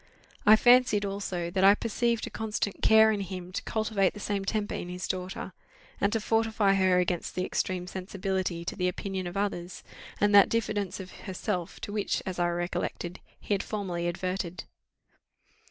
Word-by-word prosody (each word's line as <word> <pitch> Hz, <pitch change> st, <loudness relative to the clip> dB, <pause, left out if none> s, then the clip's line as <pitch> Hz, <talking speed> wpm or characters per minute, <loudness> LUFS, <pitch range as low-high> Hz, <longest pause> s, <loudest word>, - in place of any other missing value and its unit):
I 215 Hz, -, +10 dB
fancied, 240 Hz, -3 st, +5 dB
also, 190 Hz, -3 st, -3 dB
that 190 Hz, +1 st, 0 dB
I 200 Hz, +1 st, +8 dB
perceived 235 Hz, +1 st, 0 dB
a -, -, -8 dB
constant 215 Hz, -2 st, -3 dB
care 220 Hz, 0 st, +6 dB
in 210 Hz, -, -1 dB
him 185 Hz, -1 st, -6 dB
to -, -, -3 dB
cultivate 215 Hz, -3 st, 0 dB
the -, -, -7 dB
same 205 Hz, -1 st, -2 dB
temper 205 Hz, +1 st, -1 dB
in 175 Hz, -, -4 dB
his 180 Hz, +1 st, -4 dB
daughter, 185 Hz, 0 st, -4 dB, 0.5 s
and 200 Hz, -, +2 dB
to 225 Hz, -, +1 dB
fortify 220 Hz, -2 st, +2 dB
her 190 Hz, -2 st, +3 dB
against 180 Hz, -1 st, -1 dB
that 185 Hz, +1 st, 0 dB
extreme 185 Hz, -1 st, -2 dB
sensibility 185 Hz, -2 st, -3 dB
to -, -, -3 dB
the 180 Hz, -2 st, 0 dB
opinion 190 Hz, 0 st, -3 dB
of 175 Hz, +3 st, -5 dB
others, 185 Hz, -3 st, -3 dB, 0.4 s
and 205 Hz, 0 st, +3 dB
that 200 Hz, -1 st, +8 dB
diffidence 210 Hz, -4 st, -1 dB
of 190 Hz, -1 st, -8 dB
herself, 180 Hz, -3 st, -4 dB
to 205 Hz, -, -5 dB
which, 210 Hz, -2 st, -1 dB
as 185 Hz, -1 st, -4 dB
I 175 Hz, 0 st, +2 dB
recollected, 175 Hz, 0 st, -3 dB, 0.2 s
he -, -, -2 dB
had 195 Hz, -, +1 dB
formerly 180 Hz, -5 st, -3 dB
adverted. 180 Hz, 0 st, -3 dB
195 Hz, 175 wpm, -28 LUFS, 180-210 Hz, 0.5 s, I